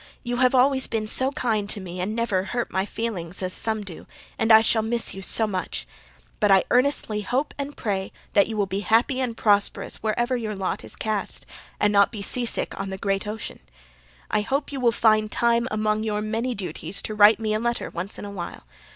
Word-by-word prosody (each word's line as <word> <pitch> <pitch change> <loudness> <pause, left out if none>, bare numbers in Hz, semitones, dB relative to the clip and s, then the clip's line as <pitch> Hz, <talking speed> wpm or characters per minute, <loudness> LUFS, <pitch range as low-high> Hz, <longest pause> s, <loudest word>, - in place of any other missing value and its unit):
You 245 -1 -2
have 255 +1 +3
always 265 +1 +4
been 220 -1 -2
SO 260 +5 +4
KIND 220 -7 -1
to 205 - -2
me 180 -1 -6
and 210 +4 -2
never 230 -5 0
hurt 240 +2 -3
my 190 +1 0
feelings 190 -7 -4
AS 185 0 -2
SOME 220 -1 -1
DO 185 -5 -10 0.3
and 225 +1 +1
I 220 0 +9
shall 220 0 +2
miss 230 +1 +2
you 195 - -7
SO 220 +3 +4
MUCH. 190 -4 -3 0.5
But 210 - +3
I 195 -1 +6
earnestly 250 -5 +2
HOPE 255 +8 -2
AND 285 +1 -5
PRAY 195 -3 -2 0.2
that 200 -2 +4
you 220 - -5
will 205 - +2
be 195 +1 -3
HAPPY 235 +5 +2
AND 235 -3 -3
PROSPEROUS 205 -2 +1
wherever 240 +4 -1
YOUR 220 -3 -3
LOT 190 -1 -3
IS - - -6
CAST 215 -2 -2 0.3
and 210 0 +2
not 200 0 +4
be 210 -3 -6
seasick 240 +3 -1
on 195 0 -3
THE 190 - -5
GREAT 195 +1 -2
OCEAN. 215 +1 -5 0.7
I 215 - +2
hope 275 +7 -2
you 275 - -4
will 240 -2 +3
find 215 -2 +2
time 235 0 +2
AMONG 215 -1 0
YOUR 210 -1 -2
MANY 230 +3 -2
DUTIES 180 0 -1
to 215 - -4
write 210 +1 +6
me 215 -1 -1
a 215 - 0
letter 235 +1 -2
ONCE 180 +4 -3
IN - - -7
A 200 - -7
WHILE. 175 - -7
215 Hz, 215 wpm, -24 LUFS, 200-235 Hz, 0.7 s, I